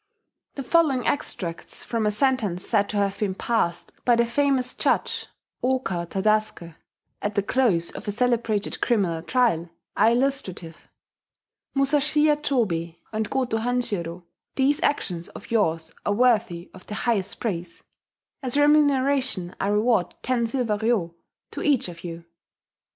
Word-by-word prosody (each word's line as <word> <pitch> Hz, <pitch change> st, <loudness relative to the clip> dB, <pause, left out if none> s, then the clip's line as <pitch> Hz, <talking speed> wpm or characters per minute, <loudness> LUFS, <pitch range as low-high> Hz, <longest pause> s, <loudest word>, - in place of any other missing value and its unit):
[*The 275 Hz, -, -4 dB
following 270 Hz, -2 st, +2 dB
extracts 170 Hz, -11 st, -3 dB
from 225 Hz, -2 st, -1 dB
a -, -, +4 dB
sentence 210 Hz, -6 st, 0 dB
said 205 Hz, -3 st, +2 dB
to 210 Hz, -, -2 dB
have 200 Hz, -1 st, 0 dB
been 195 Hz, -3 st, -1 dB
passed 190 Hz, -7 st, -1 dB
by 240 Hz, -, +4 dB
the 235 Hz, 0 st, +3 dB
famous 265 Hz, +1 st, +1 dB
judge, -, -, 0 dB, 0.4 s
Ooka 245 Hz, -10 st, 0 dB
Tadasuke, 215 Hz, -4 st, 0 dB, 0.5 s
at 205 Hz, 0 st, -2 dB
the 200 Hz, -, +2 dB
close 200 Hz, -8 st, +2 dB
of -, -, -9 dB
a -, -, 0 dB
celebrated 230 Hz, -2 st, 0 dB
criminal 190 Hz, -9 st, +1 dB
trial, 175 Hz, -5 st, +1 dB, 0.3 s
are 225 Hz, -, +5 dB
illustrative: 235 Hz, -10 st, -1 dB, 0.9 s
"Musashiya 295 Hz, +2 st, +3 dB
Chobei 195 Hz, -, -1 dB, 0.2 s
and 215 Hz, -1 st, -1 dB
Goto 250 Hz, -4 st, 0 dB
Hanshiro, 205 Hz, -8 st, -2 dB, 0.3 s
these 275 Hz, +2 st, +2 dB
actions 180 Hz, -, -1 dB
of -, -, -12 dB
yours 165 Hz, -8 st, +1 dB
are 205 Hz, -, +1 dB
worthy 205 Hz, -7 st, +1 dB
of 185 Hz, -, -14 dB
the 210 Hz, -, -5 dB
highest 210 Hz, -5 st, -1 dB
praise: 175 Hz, -7 st, -4 dB, 0.6 s
as 260 Hz, 0 st, -1 dB
a -, -, +5 dB
remuneration 275 Hz, -9 st, +2 dB
I 195 Hz, -, 0 dB
award 210 Hz, -3 st, +2 dB
ten 240 Hz, -2 st, +1 dB
silver 225 Hz, -3 st, 0 dB
ryo 215 Hz, -7 st, +1 dB, 0.4 s
to -, -, -6 dB
each 285 Hz, -, +2 dB
of 170 Hz, -1 st, -11 dB
you.... 170 Hz, -1 st, -7 dB
220 Hz, 140 wpm, -24 LUFS, 185-255 Hz, 0.9 s, are